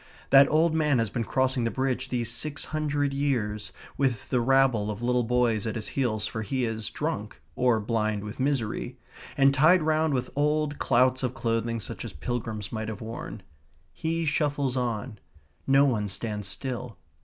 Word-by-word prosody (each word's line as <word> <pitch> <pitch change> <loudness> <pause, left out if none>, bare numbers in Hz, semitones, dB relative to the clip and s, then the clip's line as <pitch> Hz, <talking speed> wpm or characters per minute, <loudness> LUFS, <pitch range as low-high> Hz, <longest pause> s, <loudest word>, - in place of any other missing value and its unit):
That 140 0 +8
old 160 +1 +3
man 150 -4 +2
has 115 -3 0
been 120 - -1
crossing 130 +1 +1
the 115 - +1
Bridge 130 0 -2
these 120 -3 -1
six 145 +4 -1
hundred 145 -2 0
years, 110 -7 -1 0.3
with 130 -6 0
the 125 - +2
rabble 130 -4 +3
of 105 +2 -5
little 125 0 +2
boys 120 -2 +1
at 110 - -3
his 110 -2 -4
heels, 115 -6 -1
for 110 - -4
he 125 +4 -1
is 110 -2 -3
drunk, - - -4 0.2
or 125 -3 +3
blind 110 -1 -1
with 105 +4 -7
misery, 130 -5 -1 0.4
and 135 0 +5
tied 155 +6 +5
round 155 -1 +2
with 125 0 -2
old 150 0 +1
clouts 130 +1 +3
of 130 -1 -2
clothing 115 -1 -1
such 100 - -6
as - - -7
pilgrims 110 - -4
might 110 -1 -3
have 110 -2 -6
worn. 110 -2 -7 0.5
He 165 +1 -2
shuffles 145 -3 0
on. 120 -3 -2 0.5
No 135 +1 +5
one 110 -7 +1
stands 105 +1 -3
still. 125 0 -3
125 Hz, 175 wpm, -27 LUFS, 110-140 Hz, 0.5 s, That